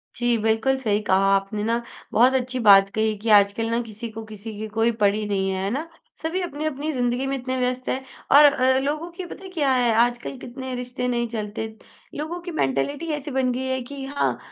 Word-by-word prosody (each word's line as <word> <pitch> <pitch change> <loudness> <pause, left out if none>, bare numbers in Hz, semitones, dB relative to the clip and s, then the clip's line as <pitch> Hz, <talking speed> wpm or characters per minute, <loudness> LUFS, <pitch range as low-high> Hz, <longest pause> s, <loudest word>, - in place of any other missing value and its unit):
जी, 240 -1 +1
बिल्कुल 225 +4 +2
सही 215 -5 0
कहा 190 +1 +4
आपने 195 +2 -2
ना। 230 +2 0 0.3
बहुत 250 +4 +5
अच्छी 255 0 -1
बात 195 0 +8
कही 220 0 +1
कि 220 +2 -4
आजकल 205 +3 +1
ना 235 +1 +1
किसी 225 0 -7
को 225 0 -7
किसी 215 0 -8
की 220 - -4
कोई 225 +2 +1
पड़ी 205 +1 +2
नहीं 195 -1 0
है, 190 0 -2
है 195 - 0
ना? 310 +6 -3 0.3
सभी 335 +4 -2
अपनी-अपनी 305 -2 -3
ज़िंदगी 245 0 0
में 275 0 -1
इतने 255 0 -3
व्यस्त 250 0 -1
हैं 265 +1 -2 0.3
और 295 - +9
अ, 260 -2 +4
लोगों 300 +5 -2
की 360 +1 -7
पता 380 - -10
है 380 - -8
क्या 295 -7 +1
है 245 -3 +3
आजकल 245 +2 -3
कितने 255 +1 -7
रिश्ते 250 0 -3
नहीं 240 -1 0
चलते, 220 0 -4 0.5
लोगों 315 +4 -4
की 350 0 -6
मेंटैलिटी 285 - -1
ऐसी 295 0 -4
बन 255 -1 +1
गई 260 +1 -3
है 260 0 -1
कि 275 -1 -6
हाँ, 280 +1 -1
250 Hz, 215 wpm, -23 LUFS, 220-270 Hz, 0.5 s, और